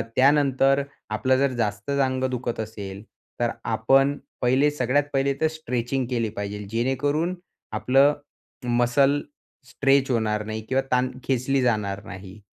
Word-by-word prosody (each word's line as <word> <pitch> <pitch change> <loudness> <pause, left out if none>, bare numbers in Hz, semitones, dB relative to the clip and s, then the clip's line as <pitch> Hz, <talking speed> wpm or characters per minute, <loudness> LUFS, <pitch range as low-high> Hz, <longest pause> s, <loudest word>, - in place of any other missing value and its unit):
त्यानंतर 135 0 +4 0.3
आपलं 130 +5 +1
जर 140 0 +2
जास्तच 115 +4 -2
अंग 130 -1 +1
दुखत 120 -2 -3
असेल, 100 -3 -6 0.4
तर 120 -1 +2 0.2
आपण 135 +6 +3 0.2
पहिले 130 +4 +3
सगळ्यात 145 0 +1
पहिले 135 0 +2
तर 160 - +4
स्ट्रेचिंग 130 -4 -2
केली 115 -3 0
पाहिजेल. 105 0 -5
जेणेकरून 145 - 0 0.4
आपलं 135 +3 +4 0.6
मसल 135 +4 +3 0.5
स्ट्रेच 135 +1 +2
होणार 105 -2 0
नाही 110 0 -4
किंवा 135 +1 +2
ताण 125 0 +2
खेचली 135 +1 +1
जाणार 105 -4 0
नाही. 95 +1 -10
130 Hz, 130 wpm, -24 LUFS, 110-135 Hz, 0.6 s, त्यानंतर